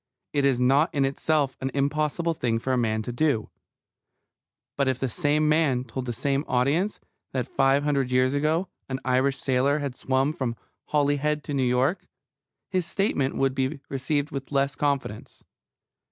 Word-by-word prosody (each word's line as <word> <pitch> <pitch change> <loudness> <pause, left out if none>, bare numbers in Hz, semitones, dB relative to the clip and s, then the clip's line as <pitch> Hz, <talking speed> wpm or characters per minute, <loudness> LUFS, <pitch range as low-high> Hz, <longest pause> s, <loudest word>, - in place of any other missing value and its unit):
It 140 -1 +2
is 135 -3 +2
not 140 +7 +3
in 140 -1 +3
itself 140 0 0
an 135 - -1
impossible 150 +4 0
thing 120 -7 0
for 130 +3 -1
a - - +3
man 110 -3 0
to 120 - -4
do. 120 -4 0 1.2
But 140 -1 +1
if 130 -1 0
the 135 - 0
same 150 +2 +1
man 150 -5 +2
told 130 +1 -6
the - - -1
same 135 +4 0
audience 145 +11 +1 0.3
that - - -1
five 140 - +2
hundred 140 -3 +1
years 130 +1 +2
ago 155 +6 +1 0.2
an 130 0 -2
Irish 130 +2 +2
sailor 135 +2 +2
had 140 -4 -3
swum 135 +3 0
from 125 -6 -3 0.3
Holyhead 145 0 +1
to 145 - -5
New 135 - +1
York, 130 +9 +1 0.6
his 185 -3 -1
statement 155 -10 0
would 135 -1 +2
be 135 +2 -1
received 140 +2 -1
with 135 0 -6
less 140 0 +1
confidence. 140 -7 -3
140 Hz, 170 wpm, -26 LUFS, 130-150 Hz, 1.2 s, not